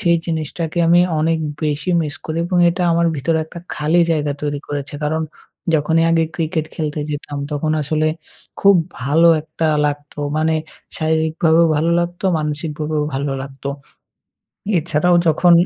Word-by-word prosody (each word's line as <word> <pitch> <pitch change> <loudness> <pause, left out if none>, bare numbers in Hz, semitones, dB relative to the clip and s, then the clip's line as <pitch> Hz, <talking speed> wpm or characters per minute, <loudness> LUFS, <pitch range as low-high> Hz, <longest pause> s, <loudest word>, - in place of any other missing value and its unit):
সেই 170 -1 +3
জিনিসটাকে 160 +1 -3
আমি 175 +1 +6 0.2
অনেক 165 +1 +1 0.3
বেশি 150 +3 -1
মিস 150 -2 -4
করি 160 +1 -3
এবং 180 -1 0
এটা 180 +1 -2
আমার 170 0 +2
ভিতরে 160 +4 0
একটা 170 +2 -10 0.2
খালি 155 +3 +2
জায়গা 150 -2 +1
তৈরি 145 -1 -1
করেছে। 145 0 -4
কারণ 160 +2 0 0.5
যখনই 160 +2 +2
আগে 165 -1 +3
ক্রিকেট 160 -1 -1
খেলতে 155 -1 -3
যেতাম 145 0 -5
তখন 155 +2 0
আসলে 155 +2 0 0.5
খুব 200 0 +6 0.3
ভালো 160 +5 +4
একটা 160 +1 -3 0.2
লাগতো। 145 0 -5 0.2
মানে 160 +1 +2 0.4
শারীরিকভাবেও 160 +1 +2
ভালো 165 +3 +1
লাগতো, 175 +2 -4
মানসিকভাবেও 150 0 -2
ভালো 140 +1 -1
লাগতো। 135 0 -7 1.1
এছাড়াও 170 +2 +2
যখন 170 +2 +4
155 Hz, 140 wpm, -19 LUFS, 150-165 Hz, 1.1 s, আমি